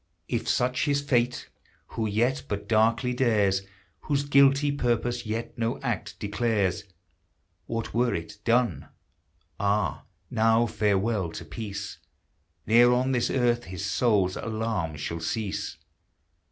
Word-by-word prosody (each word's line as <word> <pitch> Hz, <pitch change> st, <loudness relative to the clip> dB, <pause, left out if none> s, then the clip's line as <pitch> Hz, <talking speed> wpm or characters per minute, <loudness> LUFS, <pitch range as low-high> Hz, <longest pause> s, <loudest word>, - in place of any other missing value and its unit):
If -, -, -2 dB
such 125 Hz, +3 st, +1 dB
his 145 Hz, -1 st, +2 dB
fate 125 Hz, -3 st, 0 dB, 0.4 s
who 110 Hz, -2 st, -2 dB
vet 120 Hz, +7 st, +1 dB
but 100 Hz, 0 st, -4 dB
darkly 115 Hz, +3 st, +2 dB
dares. 105 Hz, -6 st, +2 dB, 0.4 s
Whose 140 Hz, -, -1 dB
guilty 140 Hz, +1 st, +4 dB
purpose 120 Hz, -3 st, -1 dB
yet 115 Hz, +2 st, -4 dB
no 115 Hz, 0 st, -1 dB
act -, -, -3 dB
declares, 105 Hz, -2 st, 0 dB, 0.8 s
What 115 Hz, -1 st, -4 dB
were 120 Hz, +1 st, +2 dB
it, 105 Hz, +5 st, -6 dB
done! 115 Hz, -, +1 dB, 0.7 s
Ah! 100 Hz, +1 st, 0 dB, 0.3 s
now 115 Hz, +1 st, +3 dB
farewell 105 Hz, -3 st, 0 dB
to 85 Hz, -, -7 dB
peace! 100 Hz, +3 st, -6 dB, 0.7 s
Ne'er 120 Hz, +3 st, +6 dB
on 125 Hz, +2 st, +2 dB
this 125 Hz, -2 st, +1 dB
earth 120 Hz, -2 st, +1 dB
his 95 Hz, +1 st, -5 dB
soul's 100 Hz, -1 st, +2 dB
alarms 110 Hz, -9 st, -3 dB
shall 85 Hz, +3 st, -3 dB
cease! 100 Hz, +4 st, -3 dB
115 Hz, 125 wpm, -27 LUFS, 100-120 Hz, 0.8 s, Ne'er